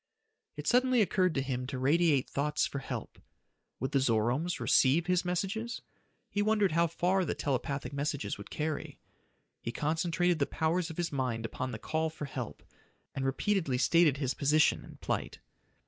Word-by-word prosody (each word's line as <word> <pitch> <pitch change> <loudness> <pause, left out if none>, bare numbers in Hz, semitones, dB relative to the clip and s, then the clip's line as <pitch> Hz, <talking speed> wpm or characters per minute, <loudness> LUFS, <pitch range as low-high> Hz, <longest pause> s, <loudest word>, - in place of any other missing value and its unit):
It 150 - -6
suddenly 255 +4 +4
occurred 185 -4 +2
to 135 - +1
him 125 -2 -3
to 135 -1 -4
radiate 145 +1 +3
thoughts 150 +2 0
for 140 - -4
help. - - -6 0.6
Would 130 +3 -2
the 140 - +3
Zoromes 125 +7 +1
receive 145 +5 +4
his 180 0 +2
messages? 195 +6 -2 0.5
He 205 - 0
wondered 210 -2 +3
how 170 +2 +3
far 180 +3 +1
the 160 - -2
telepathic 140 +1 -2
messages 145 +1 -2
would - - -9
carry. 155 -1 -3 0.6
He 115 - -3
concentrated 165 +4 0
the 140 - +2
powers 165 +2 0
of 160 - -8
his 175 -2 -1
mind 125 -5 -2
upon 130 +3 -4
the 110 - -4
call 160 +7 -1
for 155 -1 -6
help, 125 - -6 0.5
and 135 - -3
repeatedly 140 +1 0
stated 150 +2 +4
his 135 -2 -1
position 150 +2 +3
and - - -13
plight. - - -2
155 Hz, 165 wpm, -31 LUFS, 135-175 Hz, 0.6 s, suddenly